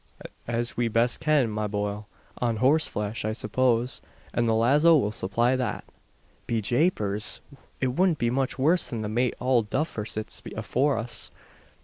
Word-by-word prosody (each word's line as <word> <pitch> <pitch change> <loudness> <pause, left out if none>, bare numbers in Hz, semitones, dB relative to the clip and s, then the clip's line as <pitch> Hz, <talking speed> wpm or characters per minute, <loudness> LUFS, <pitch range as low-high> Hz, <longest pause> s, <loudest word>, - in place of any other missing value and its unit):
"As 120 +1 -1
we 120 -1 +1
best 115 +2 +1
can, 150 -7 +2
ma 105 0 -2
bohil. 105 0 -3 0.3
On 120 -2 0
horseflesh, 120 -5 +1
I 110 +1 -1
suppose: 125 +1 0 0.3
and 120 -1 +1
the 110 - +3
lazo 145 +8 +5
will 105 -7 0
supply 115 +5 +1
that." 125 -4 -2 0.6
"Be 115 - 0
Japers! 110 - 0 0.4
it 130 - +1
wudn't 180 -2 +3
be 120 -2 0
much 135 +2 -1
worse 160 +6 +3
than 115 -3 -4
the - - -2
mate 120 +3 0
Owld 120 -4 +1
Duffer 130 -8 -2
sits 110 -1 -2 0.2
afore 140 0 +1
us. 115 +1 -4
120 Hz, 155 wpm, -26 LUFS, 110-130 Hz, 0.6 s, lazo